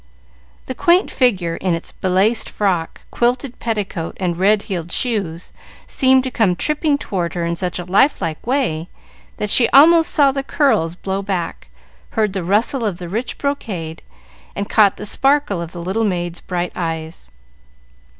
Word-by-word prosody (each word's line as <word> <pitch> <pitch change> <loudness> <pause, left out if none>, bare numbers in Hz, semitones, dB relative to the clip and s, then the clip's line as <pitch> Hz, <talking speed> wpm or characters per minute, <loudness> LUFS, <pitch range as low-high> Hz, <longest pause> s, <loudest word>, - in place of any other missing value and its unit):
The - - -4
quaint 345 +8 +3
figure, 185 -10 +1
in 180 -2 0
its 165 - -6
belaced 190 +5 0
frock, 180 -5 -1
quilted 245 +2 -1
petticoat, 205 -7 -3
and 180 -3 -1
red 200 +4 +3
heeled 175 -5 -5
shoes, 195 -9 -2 0.3
seemed 260 -1 +3
to 260 - -4
come 210 -7 +2
tripping 300 - 0
toward 180 - -3
her 170 -1 -1
in 170 0 -1
such 180 0 -3
a 175 - -5
life 200 +11 +3
like 165 +2 -4
way, 225 - -1 0.5
that 210 -1 -2
she 240 - +5
almost 325 +4 +6
saw 280 -2 +4
the 275 0 -2
curls 265 - +1
blow 195 +2 -3
back, 190 - -4 0.5
heard 215 -3 +1
the 190 -3 -3
rustle 220 +8 +1
of 205 -6 -1
the 175 -1 -7
rich 225 +7 -3
brocade, 195 - -4 0.5
and 200 0 -3
caught 205 -3 +4
the 210 - -7
sparkle 270 -4 +1
of 170 -1 -6
the 175 -1 -7
little 195 +6 -1
maid's 175 -4 -2
bright 175 -1 -3
eyes. 165 -1 -5
195 Hz, 165 wpm, -19 LUFS, 175-250 Hz, 0.5 s, almost